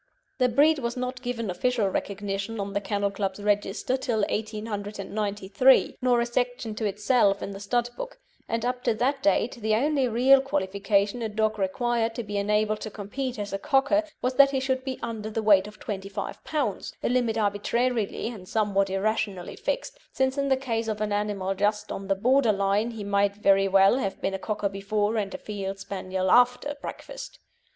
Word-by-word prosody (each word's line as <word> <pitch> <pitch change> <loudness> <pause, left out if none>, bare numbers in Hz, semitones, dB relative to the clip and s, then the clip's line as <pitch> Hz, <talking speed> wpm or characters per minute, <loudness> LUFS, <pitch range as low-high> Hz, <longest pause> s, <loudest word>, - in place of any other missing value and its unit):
The 250 -1 +4
breed 290 +5 +4
was 235 -1 -3
not 250 +1 -3
given 235 -5 -3
official 230 +3 +1
recognition 200 +2 -3
on 200 0 -3
the 200 - 0
Kennel 200 0 -1
Club's 195 -1 -3
register 205 +4 0
till 235 -4 -1
1893, 210 +1 0
nor 250 -1 +3
a 235 - +2
section 245 -2 -2
to 215 +1 -3
itself 205 0 +2
in 200 - -4
the 195 - -7
Stud 240 +4 0
Book; - - -7 0.3
and 230 +1 -1
up 250 0 -2
to 235 -3 +2
that 270 +4 0
date 275 -4 +2
the 215 0 +2
only 275 +2 +2
real 255 +4 +5
qualification 200 -2 0
a 225 - -2
dog 215 0 0
required 230 +3 0
to 235 - -3
be 205 -1 -3
enabled 210 +1 +1
to 215 - -4
compete 225 +5 -5
as 205 -1 -5
a 195 - -1
Cocker 275 +7 +3 0.2
was 250 +1 +1
that 280 -1 +8
he 270 -1 0
should 260 0 -1
be 265 -1 -4
under 220 -2 -4
the 220 0 -2
weight 205 -2 +5
of 210 - -12
25 195 -1 -5
lb., 285 -10 -2
a - - +2
limit 240 -3 +1
arbitrarily 220 +2 0
and 200 -6 -10
somewhat 200 -3 +1
irrationally 195 -1 -1
fixed, - - -3
since 265 0 0
in 280 -1 0
the 265 - +4
case 230 -4 -2
of 215 -1 -2
an 215 -1 -1
animal 205 -2 -1
just 210 +2 0
on 195 - -5
the 195 - +2
border 245 +3 +3
line 200 +2 +1
he 225 -3 -6
might 200 0 +1
very 195 -1 +4
well 195 +5 +5
have 195 -6 -3
been 195 - -1
a 195 - -3
Cocker 210 0 -2
before 205 +2 -1
and 200 -2 -1
a - - -3
Field 195 -2 -5
Spaniel 190 -1 -2
after 250 +4 +4
breakfast. - - -8
215 Hz, 190 wpm, -26 LUFS, 200-250 Hz, 0.3 s, that